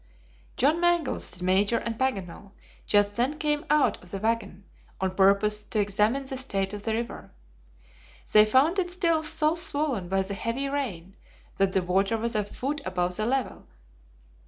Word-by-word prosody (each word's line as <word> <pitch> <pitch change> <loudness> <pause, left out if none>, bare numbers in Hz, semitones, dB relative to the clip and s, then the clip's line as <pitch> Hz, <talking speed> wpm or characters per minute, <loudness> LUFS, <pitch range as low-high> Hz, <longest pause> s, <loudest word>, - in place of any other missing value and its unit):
John 300 +5 +3
Mangles, 345 -4 +1
the 180 0 -8
Major, 200 +5 +2
and 230 0 -3
Paganel 200 -6 -3 0.3
just 205 0 +2
then 260 +6 0
came 300 -1 -1
out 300 0 +2
of 180 - -14
the 195 - -5
wagon 215 -2 -2 0.3
on 190 -1 -1
purpose 200 +2 +3
to 215 - -2
examine 210 +6 +1
the 265 0 -5
state 195 -7 -1
of 205 - -5
the 220 +1 -1
river. 235 +1 -5 1.0
They 215 0 +7
found 285 - +3
it 355 -1 -1
still 335 -3 +1
so 305 0 +2
swollen 290 - 0
by 195 0 +1
the 195 +1 -5
heavy 230 +7 -2
rain 200 -11 -4 0.4
that 195 -1 +1
the 190 - +1
water 195 +5 +1
was 230 +1 -2
a 210 -2 +1
foot 275 +8 -4
above 180 -1 -2
the 215 +2 -1
level. 265 +1 -2
220 Hz, 170 wpm, -26 LUFS, 195-275 Hz, 1.0 s, They